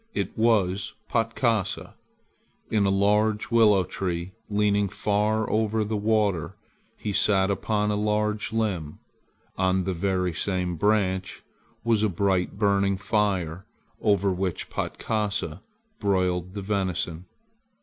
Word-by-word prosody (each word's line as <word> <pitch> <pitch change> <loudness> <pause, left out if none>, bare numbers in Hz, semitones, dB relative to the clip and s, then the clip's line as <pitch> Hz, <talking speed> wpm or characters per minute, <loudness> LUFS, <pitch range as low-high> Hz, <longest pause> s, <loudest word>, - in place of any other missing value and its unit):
It - - -2
was 105 -4 +1 0.2
Patkasa. 115 -3 0 0.8
In 105 -3 +3
a - - +3
large 105 +3 +2
willow 105 -5 +5
tree 90 0 -3 0.2
leaning 105 -1 +2
far 105 +2 0
over 110 0 +1
the 105 +1 -2
water 105 -5 +1 0.4
he 105 - -3
sat 95 -1 +3
upon 105 +1 0
a - - 0
large 105 0 0
limb. 95 -9 -2 0.6
On 95 0 +2
the 95 +1 -1
very 90 0 0
same 90 0 -1
branch 95 -1 0 0.4
was 115 -2 +2
a 110 - +2
bright 95 0 0
burning 100 -2 +2
fire 95 -5 -1 0.3
over 100 -2 +2
which 90 -2 -3
Patkasa 105 -6 -2 0.4
broiled 90 -2 0
the 100 - -4
venison. 95 -4 -2
100 Hz, 120 wpm, -26 LUFS, 95-105 Hz, 0.8 s, willow